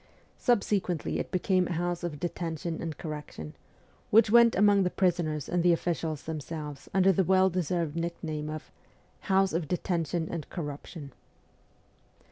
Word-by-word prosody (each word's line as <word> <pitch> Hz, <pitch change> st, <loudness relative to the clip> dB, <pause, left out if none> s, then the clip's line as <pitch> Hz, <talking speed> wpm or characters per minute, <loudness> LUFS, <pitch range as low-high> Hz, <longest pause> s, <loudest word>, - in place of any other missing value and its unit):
Subsequently 200 Hz, -, +1 dB
it -, -, -3 dB
became 185 Hz, -1 st, +1 dB
a 175 Hz, -, -2 dB
house 175 Hz, +1 st, -2 dB
of 160 Hz, -4 st, -4 dB
detention 165 Hz, -1 st, -3 dB
and 160 Hz, -3 st, -4 dB
correction, 150 Hz, -, -7 dB, 0.6 s
which 220 Hz, 0 st, +5 dB
went 235 Hz, 0 st, +7 dB
among 205 Hz, 0 st, +5 dB
the 180 Hz, -, +2 dB
prisoners 165 Hz, -6 st, 0 dB
and 175 Hz, 0 st, +1 dB
the 175 Hz, 0 st, +5 dB
officials 165 Hz, -3 st, -2 dB
themselves 150 Hz, -2 st, -6 dB
under 195 Hz, 0 st, +4 dB
the 190 Hz, +1 st, +2 dB
well 190 Hz, +1 st, +4 dB
deserved 170 Hz, -3 st, -1 dB
nickname 160 Hz, -3 st, -3 dB
of 155 Hz, 0 st, -7 dB, 0.5 s
'house 195 Hz, -2 st, +2 dB
of 165 Hz, -2 st, -1 dB
detention 170 Hz, -1 st, -1 dB
and 165 Hz, -3 st, -5 dB
corruption.' 145 Hz, -2 st, -7 dB
170 Hz, 140 wpm, -29 LUFS, 155-185 Hz, 0.6 s, went